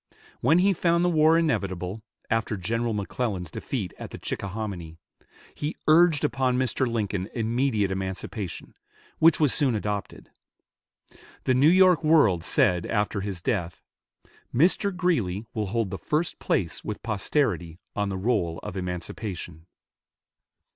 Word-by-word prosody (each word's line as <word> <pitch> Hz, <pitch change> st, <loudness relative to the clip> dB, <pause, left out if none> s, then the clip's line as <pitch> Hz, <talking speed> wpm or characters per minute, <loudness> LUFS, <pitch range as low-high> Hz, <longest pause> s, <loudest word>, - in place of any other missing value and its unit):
When 160 Hz, -, +4 dB
he 195 Hz, +2 st, +4 dB
found 170 Hz, 0 st, +2 dB
the -, -, +3 dB
war 160 Hz, 0 st, +5 dB
inevitable, 100 Hz, -, -1 dB, 0.3 s
after 110 Hz, -2 st, -1 dB
General 115 Hz, +5 st, -1 dB
McClellan's 100 Hz, -4 st, -3 dB
defeat 100 Hz, -5 st, -4 dB
at -, -, -7 dB
the -, -, -8 dB
Chickahominy, 95 Hz, -5 st, -5 dB, 0.6 s
he 150 Hz, +2 st, -4 dB
urged 160 Hz, -1 st, +5 dB
upon 130 Hz, -2 st, +1 dB
Mr. 130 Hz, 0 st, +1 dB
Lincoln 105 Hz, -4 st, -2 dB
immediate 115 Hz, -3 st, 0 dB
emancipation, 95 Hz, +1 st, -5 dB, 0.5 s
which 165 Hz, 0 st, +5 dB
was 150 Hz, -4 st, +4 dB
soon 135 Hz, -6 st, +2 dB
adopted. 105 Hz, -1 st, -4 dB, 1.1 s
The 130 Hz, -, +2 dB
"New 135 Hz, +5 st, +5 dB
York 180 Hz, -2 st, +5 dB
World" 145 Hz, -, +4 dB
said 90 Hz, -, +2 dB
after 105 Hz, -1 st, 0 dB
his 95 Hz, -3 st, -5 dB
death, 90 Hz, -8 st, -2 dB, 0.7 s
"Mr. 180 Hz, -, +2 dB
Greeley 115 Hz, -, 0 dB
will 110 Hz, -3 st, -2 dB
hold 110 Hz, -1 st, -1 dB
the 95 Hz, -, -5 dB
first 155 Hz, +3 st, -1 dB
place 85 Hz, -4 st, -1 dB
with 105 Hz, -, -5 dB
posterity 105 Hz, -, -1 dB, 0.2 s
on 105 Hz, -1 st, 0 dB
the 95 Hz, -, -3 dB
roll 95 Hz, -6 st, 0 dB
of 105 Hz, -2 st, -6 dB
emancipation." 90 Hz, -2 st, -6 dB
110 Hz, 135 wpm, -26 LUFS, 95-145 Hz, 1.1 s, war